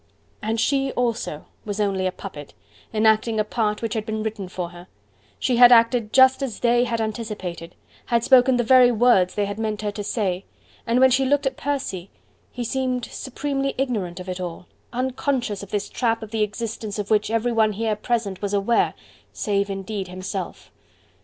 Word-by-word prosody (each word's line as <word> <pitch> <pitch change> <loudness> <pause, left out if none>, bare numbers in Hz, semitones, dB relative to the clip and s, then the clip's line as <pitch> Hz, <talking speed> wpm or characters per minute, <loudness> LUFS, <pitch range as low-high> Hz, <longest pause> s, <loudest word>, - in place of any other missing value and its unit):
And 220 +2 -1
she 270 +2 +1
also 230 -11 -2 0.2
was 205 0 -4
only 195 -2 +1
a - - -1
puppet, 150 -7 -10 0.4
enacting 220 0 +2
a - - +3
part 210 0 -1
which 225 - -1
had 220 - -2
been 220 0 -3
written 215 -4 -4
for 180 -2 -4
her: 175 +1 -13 0.5
she 250 -2 0
had 245 0 +9
acted 230 -2 +4
just 260 +1 +6
as 255 -7 -4
THEY 240 0 +3
had 235 -2 -2
anticipated, 210 -6 -5 0.3
had 235 -2 +1
spoken 255 0 +5
the 240 - +2
very 250 +1 +6
words 225 -6 +3
they 205 - +1
had 205 +1 -5
meant 215 -1 -2
her 210 - -1
to 205 0 -5
say: 195 -4 -1 0.4
and 235 +2 +2
when 260 0 +6
she 265 +2 +3
looked 285 +2 +1
at 265 -1 0
Percy, 255 -12 -3 0.4
he 245 - -4
seemed 255 0 -1
supremely 275 +1 -3
ignorant 210 -10 -2
of 180 - -8
it 185 0 -4
all, 175 0 -6 0.3
unconscious 250 -3 -1
of 200 - -9
this 205 -1 -2
trap 230 -2 -1
of 215 - -9
the 220 -1 -1
existence 215 0 -3
of 205 0 -4
which 210 -1 +3
everyone 225 -1 +2
here 220 +1 -1
present 210 -3 -2
was 205 0 -1
aware, 205 +4 +2 0.4
save 200 -2 -1
indeed 195 0 -4
himself. 185 0 -6
220 Hz, 185 wpm, -23 LUFS, 200-245 Hz, 0.5 s, had